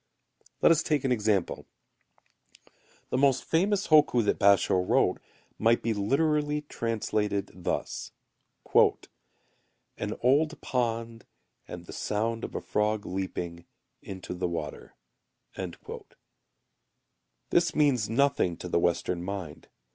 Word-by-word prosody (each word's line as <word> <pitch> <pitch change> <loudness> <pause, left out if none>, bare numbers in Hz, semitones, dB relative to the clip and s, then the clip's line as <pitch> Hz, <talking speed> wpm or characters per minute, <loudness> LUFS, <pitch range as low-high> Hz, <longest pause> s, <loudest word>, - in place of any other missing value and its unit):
Let - - +7
us 165 -1 +4
take 150 -4 0
an 135 - 0
example. 105 -5 0 1.4
The - - +1
most 135 -2 +3
famous 195 +5 +1
hokku 145 -7 +5
that - - +1
Basho[u] 100 -2 +4
wrote, - - +3 0.4
might 115 +2 +3
be 115 - +1
literally 150 +7 +1
translated 110 -6 -2
thus: 90 - -4 0.6
"An - - -2
old 150 +6 +2
pond 115 -2 -2 0.4
And 90 0 -8
the - - -10
sound 115 +2 -2
of - - -6
a - - -2
frog 105 0 -1
leaping 90 -2 -5 0.3
Into 95 -2 -7
the 90 0 -2
water." 85 -3 -6 2.6
This 170 -1 +2
means 135 -8 +2
nothing 115 -8 +1
to - - -7
the 85 - +1
Western 85 +1 0
mind. 95 -5 -6
115 Hz, 110 wpm, -28 LUFS, 95-140 Hz, 2.6 s, Let